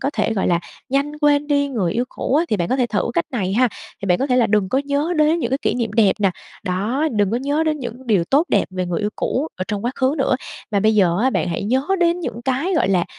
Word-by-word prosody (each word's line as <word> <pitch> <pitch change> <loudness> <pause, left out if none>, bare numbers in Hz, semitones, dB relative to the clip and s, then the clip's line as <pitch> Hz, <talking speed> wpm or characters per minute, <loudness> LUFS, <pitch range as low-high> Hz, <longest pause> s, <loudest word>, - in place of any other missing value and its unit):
có 280 - 0
thể, 230 - 0
gọi 195 - 0
là, 170 -1 +2 0.3
nhanh 280 +2 0
quên 295 0 +3
đi 285 -1 +1
người 205 -11 -1
yêu 240 - 0
cũ 265 - -3
á 325 +3 +3
thì 215 - +1
bạn 175 -2 -1
có 260 - +1
thể 250 -2 +1
thử 205 -5 -1
cách 170 - +1
này 195 -7 -2
ha, 250 +4 +3 0.3
thì 195 - -3
bạn 180 -1 +3
có 270 - 0
thể 250 -2 +2
là 235 -2 +4
đừng 210 -3 +1
có 260 - +1
nhớ 285 +4 -1
đến 305 +2 +3
những 240 -7 -2
cái 270 - +1
kỷ - - +1
niệm 230 -4 -2
đẹp 210 -3 +4
nè, 195 - +3 0.3
đó, 215 +12 0
đừng 205 -3 +1
có 230 - 0
nhớ 285 +4 -1
đến 305 -1 0
những 245 0 -7
điều 195 -7 +2
tốt 285 - +3
đẹp - - +3
về 185 -1 -3
người 175 -1 -2
yêu 210 0 -1
cũ 295 +5 -1
ở 185 - -3
trong 210 0 -3
quá 245 - +1
khứ 265 +2 +1
nữa. 265 -1 +2 0.3
Mà 200 - +1
bây 215 +2 +3
giờ 180 -4 +3
á 260 - +3
bạn 180 - -1
hãy 170 - -2
nhớ 255 +6 +1 0.2
đến 345 0 +2
những 240 -6 -5
cái, 270 +9 0
gọi 320 - +2
là, 180 -3 +2
245 Hz, 290 wpm, -20 LUFS, 200-280 Hz, 0.3 s, là